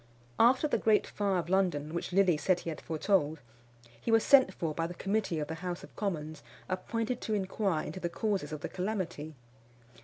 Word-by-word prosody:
After 255 +6 +5
the - - +1
great 215 -2 +3
fire 200 -2 -1
of 170 -2 -2
London, 175 -5 +1
which 170 - -3
Lilly 185 -2 +4
said 175 +4 +1
he 165 - -4
had 155 - -7
foretold, 160 -1 +1 0.6
he - - -4
was 225 -1 +5
sent 265 -8 +6
for 165 -4 -3
by 165 +2 -1
the 175 - -8
committee 200 -3 -1
of 150 -1 -2
the 160 - -4
House 180 -1 -4
of - - -13
Commons 155 -7 -3 0.3
appointed 230 +6 -2
to 215 - -1
inquire 190 -4 -1
into 160 +5 -6
the 175 -1 -2
causes 195 -5 -1
of 155 -1 -5
the - - -4
calamity. 180 -6 -3
185 Hz, 195 wpm, -31 LUFS, 160-210 Hz, 0.6 s, sent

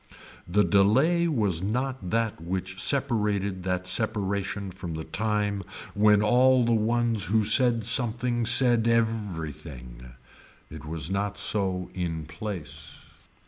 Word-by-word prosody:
The 100 +4 +2
delay 135 - +3
was 105 - 0
not 125 0 -3
that 115 -5 -1
which 95 +2 -4
separated 105 -8 0
that 90 -1 -2
separation 100 0 -2
from 90 -3 -7
the 80 - -5
time 105 +3 -2 0.3
when 105 0 +4
all 125 +3 +4
the 120 - +1
ones 115 -1 +1
who 110 +4 +1
said 115 0 +2
something 120 0 +1
said 120 -2 +6
every 110 -9 0
thing. 60 -2 -12 0.6
It 80 0 -9
was 80 +1 -4
not 100 +1 -2
so 95 -3 -1
in 80 -4 -4
place. 85 +2 -7
105 Hz, 125 wpm, -26 LUFS, 90-115 Hz, 0.6 s, said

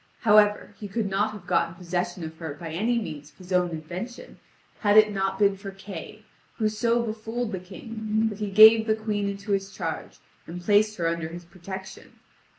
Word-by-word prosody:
However, 210 -1 +4
he 210 - -6
could 210 +1 -2
not 200 +2 +1
have 205 -4 -10
gotten 170 -1 +1
possession 175 0 -3
of 160 0 -6
her 160 -4 -5
by 165 +1 -7
any 220 +9 0
means 150 -10 -5
of - - -27
his 185 0 -8
own 180 -1 +3
invention, 175 +9 -7 0.4
had 205 -1 +4
it 215 0 +7
not 195 -1 -1
been 200 -1 +3
for 195 +1 -8
Kay, 195 +1 -9 0.3
who 215 -2 +1
so 230 +2 +1
befooled 225 +1 -4
the 190 - -3
King 220 +3 -3
that 205 -1 -8
he 210 -1 -2
gave 220 +2 +8
the 220 - +3
Queen 210 -2 -2
into 200 +1 -5
his 195 0 0
charge 165 -5 -5 0.3
and 175 +2 -6
placed 210 +3 +3
her 170 -2 0
under 165 -1 -1
his 170 +1 -9
protection. 190 +2 -9
200 Hz, 195 wpm, -26 LUFS, 175-215 Hz, 0.4 s, gave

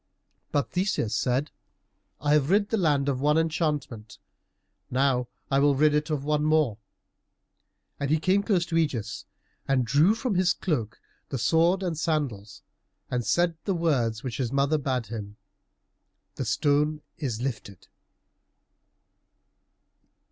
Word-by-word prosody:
But 145 -2 0
Theseus 180 - 0
said, 130 +6 0 0.7
"I 145 +1 +1
have 150 -1 +3
rid 205 +2 +3
the - - +1
land 145 -7 +2
of 135 -2 -1
one 150 +2 +3
enchantment, 150 -9 -2 0.7
now 130 -1 +1 0.2
I 135 - +3
will 140 0 +4
rid 150 +2 +4
it 150 +1 0
of 150 -3 -1
one 150 0 +1
more." 155 -8 +2 1.2
And 140 - -2
he 155 +1 +3
came 190 +5 +2
close 195 -5 +1
to 170 - -4
Ægeus 145 -10 -1 0.4
and 130 -2 +2
drew 150 - +4
from 225 0 -2
his 180 -1 +3
cloak 115 - -3 0.3
the 135 - -3
sword 170 +9 +2
and 175 -3 -1
the 160 - -6
sandals, 140 - -2 0.5
and 125 -1 0
said 170 +9 +1
the 195 - 0
words 130 -9 0
which 125 -4 -4
his 125 -3 -2
mother 140 +3 +2
bade 130 -4 -1
him, 105 -1 -7 1.0
"The 135 - -4
stone 150 +6 +1 0.2
is 125 -7 -3
lifted." 115 -7 -5
145 Hz, 140 wpm, -26 LUFS, 125-160 Hz, 1.2 s, will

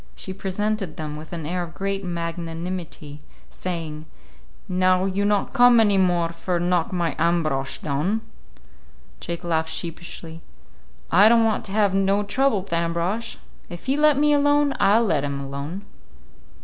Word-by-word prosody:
She 190 - -6
presented 195 -2 -3
them 150 -1 -5
with 155 +1 -10
an 165 -3 -5
air 180 +3 -2
of 170 -1 -7
great 195 0 -2
magnanimity, 170 -2 -5 0.3
saying, 160 -4 -5 0.6
"Now 185 0 +2
you 195 +1 0
not 205 +3 +1
come 245 -2 +6
any 205 -3 +4
more 175 -2 +2
for 170 +1 -2
knock 175 -1 +1
my 170 -3 -1
Ambrosch 155 -5 0
down?" 155 +10 -1 1.0
Jake 170 0 -5
laughed 160 -2 0
sheepishly. 165 0 -6 0.7
"I 200 +6 +7
don't 230 -1 +5
want 220 -1 0
to 195 - -3
have 205 -2 +2
no 195 +1 +2
trouble 220 -1 +1
with 195 - -8
Ambrosch. 170 +6 -1 0.3
If 175 -1 -9
he'll 275 +3 0
let 305 -2 +5
me 295 +1 +4
alone, 290 0 +3
I'll 225 +4 +4
let 160 -8 +1
him 140 -1 -3
alone." 140 +7 -6
180 Hz, 150 wpm, -23 LUFS, 165-205 Hz, 1.0 s, I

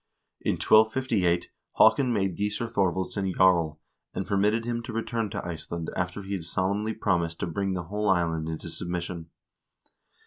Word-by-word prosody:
In - - +1
1258 110 -6 +3 0.2
Haakon 125 +3 +5
made 95 -5 0
Gissur 105 +3 -1
Thorvaldsson 95 -2 0
jarl, 85 -5 +3 0.4
and 95 - -2
permitted 105 +3 +1
him 120 0 -1
to 115 - -7
return 115 -1 -2
to 100 -2 -5
Iceland 85 0 -5
after 90 +3 -2
he 100 +1 -5
had 95 -4 -3
solemnly 100 +5 -1
promised 85 -4 0
to - - +1
bring 95 +3 -1
the 90 -1 -2
whole 105 +4 -1
island 85 -3 +1
into 80 - -5
submission. 85 -1 -4
95 Hz, 150 wpm, -27 LUFS, 85-110 Hz, 0.4 s, Haakon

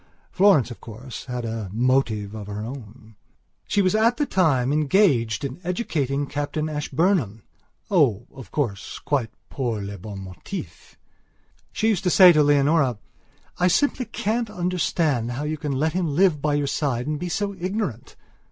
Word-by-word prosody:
Florence, 185 - +4
of 120 - -10
course, 120 +3 -9
had 125 -2 -4
a 110 -3 -4
motive 110 -3 +1
of 105 -2 -7
her 105 +1 -5
own. 115 -3 -10 0.5
She 205 -1 +2
was 185 - +2
at 225 +3 +3
that 295 - -1
time 145 -8 +2
engaged 145 - +2
in 135 +5 -6
educating 145 - -1
Captain 145 +2 -3
Ashburnhamoh, 150 - 0 0.5
of 130 - 0
course, 115 -10 -3
quite 135 -6 -1 0.2
pour 120 -6 -2
le 100 0 -6
bon 100 +2 -8
motif! 95 -2 -9 0.7
She 220 - +1
used 195 -4 0
to - - +4
say 180 0 +8
to 155 -3 +4
Leonora: 145 -3 +3 0.6
"I 180 - +4
simply 260 - +1
can't 225 +2 -2
understand 170 - 0
how 135 +4 -4
you 155 0 -3
can 145 -3 -2
let 155 +4 0
him 180 -1 0
live 175 -4 +3
by 150 0 +1
your 145 -1 0
side 135 -4 -1
and 150 0 -2
be 180 - -4
so 200 +3 -2
ignorant!" 185 - -4
145 Hz, 160 wpm, -23 LUFS, 120-180 Hz, 0.7 s, say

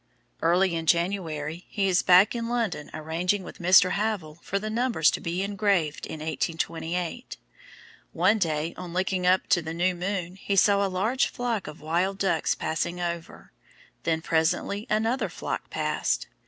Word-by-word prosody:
Early 175 +2 +3
in 165 -1 -3
January 170 -2 0
he 200 -2 0
is 180 -2 +3
back 185 +4 +6
in 230 -1 -3
London 230 -11 -2
arranging 170 +5 -1
with - - -10
Mr. 185 +1 +6
Havell 195 -7 -2
for 200 - -2
the 215 +2 -4
numbers 230 -9 +2
to - - -3
be 175 +3 -2
engraved 195 -6 0
in 155 - -7
1828. 165 +6 -3 0.7
One 190 +6 +3
day 160 -2 -1
on 180 -2 -7
looking 185 0 0
up 185 +1 +4
to 190 -4 +4
the 160 0 -5
new 180 +2 +2
moon 180 0 -3
he 200 +1 -2
saw 200 +1 +4
a 195 - 0
large 215 +8 +1
flock 240 -5 -3
of 150 - -9
wild 175 +5 0
ducks 190 -5 +1
passing 170 +3 -2
over, 170 -1 -5 0.5
then 160 -1 -1
presently 165 +7 0
another 225 +4 +1
flock - - -5
passed. - - -1
180 Hz, 160 wpm, -26 LUFS, 165-200 Hz, 0.7 s, back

